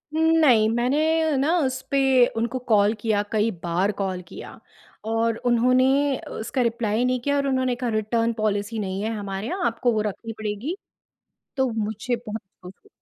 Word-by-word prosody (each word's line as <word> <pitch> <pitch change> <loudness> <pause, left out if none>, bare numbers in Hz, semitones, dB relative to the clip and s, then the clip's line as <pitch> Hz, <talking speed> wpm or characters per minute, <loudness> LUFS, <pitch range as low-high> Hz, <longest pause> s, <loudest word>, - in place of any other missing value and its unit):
उम, - - 0 0.2
नहीं 235 -8 +5
मैंने 305 +6 +1
ना 300 +6 +2
उस 260 -2 -1
पे 265 -2 +4
उनको 235 +3 -1
कॉल 205 +1 +4
किया, 210 -2 +1
कई 220 +1 +2
बार 180 +4 +1
कॉल 185 -2 -2
किया - - -10 0.5
और 225 0 0
उन्होंने 255 +3 +3 0.2
उसका 245 +4 -2
रिप्लाई 230 -1 0
नहीं 255 0 +1
किया 285 +2 0
और 280 - 0
उन्होंने 260 -2 +1
कहा 245 0 -3
रिटर्न 230 +1 0
पॉलिसी 215 0 -2
नहीं 195 -1 -3
है 220 - -1
हमारे 200 +1 -4
यहाँ, 360 +5 -2
आपको 235 +1 0
वो 215 - +1
रखनी 215 +2 -5
पड़ेगी। 220 - -3 0.8
तो 265 -1 +2
मुझे 220 +2 -2
बहुत 215 +1 -5 0.2
दुःख 180 +2 -13
230 Hz, 165 wpm, -24 LUFS, 215-260 Hz, 0.8 s, नहीं